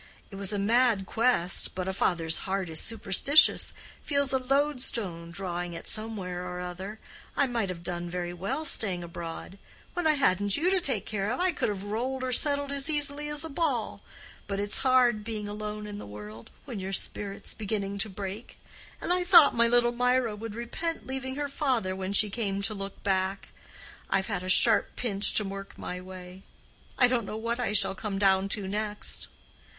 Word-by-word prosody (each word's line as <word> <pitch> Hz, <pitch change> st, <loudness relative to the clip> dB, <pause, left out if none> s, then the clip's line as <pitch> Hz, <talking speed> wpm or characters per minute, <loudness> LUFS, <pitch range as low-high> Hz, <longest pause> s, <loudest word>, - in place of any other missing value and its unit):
It -, -, -8 dB
was 195 Hz, 0 st, +1 dB
a 205 Hz, -, 0 dB
mad 220 Hz, 0 st, +3 dB
quest; 220 Hz, -5 st, +2 dB
but 185 Hz, 0 st, -3 dB
a 190 Hz, -, -1 dB
father's 165 Hz, -4 st, +1 dB
heart 190 Hz, -3 st, -1 dB
is 160 Hz, -, -2 dB
superstitious—feels 280 Hz, -, +2 dB
a 265 Hz, -, +3 dB
loadstone 250 Hz, -, -1 dB
drawing 175 Hz, -1 st, -4 dB
it 170 Hz, -, -8 dB
somewhere 195 Hz, -5 st, -3 dB
or 180 Hz, 0 st, -5 dB
other. 185 Hz, +4 st, -6 dB, 0.4 s
I 280 Hz, -, +4 dB
might 235 Hz, -6 st, -1 dB
have 170 Hz, -2 st, -6 dB
done 175 Hz, 0 st, -3 dB
very 175 Hz, 0 st, -3 dB
well, 240 Hz, -, -3 dB
staying 190 Hz, -, +1 dB
abroad: 170 Hz, +3 st, -7 dB, 0.3 s
when 350 Hz, -2 st, 0 dB
I 310 Hz, -, +5 dB
hadn't 205 Hz, -8 st, +2 dB
you 350 Hz, +5 st, +2 dB
to 380 Hz, -1 st, +2 dB
take 225 Hz, -, -1 dB
care 205 Hz, 0 st, -2 dB
of, 255 Hz, -, -2 dB
I 365 Hz, 0 st, +3 dB
could 310 Hz, -, -1 dB
have 200 Hz, -2 st, -3 dB
rolled 250 Hz, +6 st, -2 dB
or 255 Hz, -, -1 dB
settled 285 Hz, +2 st, +4 dB
as 280 Hz, +1 st, -1 dB
easily 295 Hz, 0 st, +1 dB
as 295 Hz, 0 st, -1 dB
a 320 Hz, -, -6 dB
ball; 275 Hz, -10 st, -1 dB, 0.5 s
but 200 Hz, 0 st, -2 dB
it's 205 Hz, 0 st, 0 dB
hard 250 Hz, -5 st, +4 dB
being 215 Hz, -1 st, -4 dB
lonely 210 Hz, 0 st, -5 dB
in 205 Hz, -, -6 dB
the -, -, -8 dB
world, 105 Hz, +2 st, -10 dB, 0.2 s
when 240 Hz, -7 st, -5 dB
your 190 Hz, +1 st, -4 dB
spirit's 200 Hz, +1 st, -2 dB
beginning 200 Hz, -2 st, -3 dB
to 215 Hz, -, 0 dB
break. 195 Hz, +3 st, -7 dB, 0.4 s
And 355 Hz, -, +1 dB
I 360 Hz, 0 st, +1 dB
thought 350 Hz, -5 st, +8 dB
my 235 Hz, 0 st, +4 dB
little 240 Hz, 0 st, +4 dB
Mirah 250 Hz, -2 st, +1 dB
would 215 Hz, 0 st, -7 dB
repent 325 Hz, +8 st, -4 dB
leaving 260 Hz, 0 st, -4 dB
her 290 Hz, 0 st, -2 dB
father 255 Hz, -9 st, 0 dB
when 190 Hz, 0 st, -3 dB
she 205 Hz, +1 st, +3 dB
came 200 Hz, -3 st, -2 dB
to 215 Hz, -, 0 dB
look 195 Hz, -1 st, -7 dB
back. 190 Hz, 0 st, 0 dB, 0.6 s
I've 195 Hz, 0 st, +1 dB
had 200 Hz, -4 st, -2 dB
a 185 Hz, -, -5 dB
sharp 220 Hz, +4 st, +5 dB
pinch 205 Hz, -4 st, 0 dB
to 215 Hz, -, +3 dB
work 195 Hz, 0 st, -7 dB
my 180 Hz, 0 st, -5 dB
way; 185 Hz, 0 st, -10 dB, 0.6 s
I 250 Hz, -, +6 dB
don't 240 Hz, -4 st, 0 dB
know 215 Hz, -, -4 dB
what 230 Hz, +2 st, -2 dB
I 245 Hz, -4 st, 0 dB
shall 210 Hz, -, +2 dB
come 200 Hz, 0 st, -4 dB
down 195 Hz, 0 st, +3 dB
to 200 Hz, -1 st, -3 dB
next. 210 Hz, +1 st, -2 dB
210 Hz, 190 wpm, -28 LUFS, 190-255 Hz, 0.6 s, thought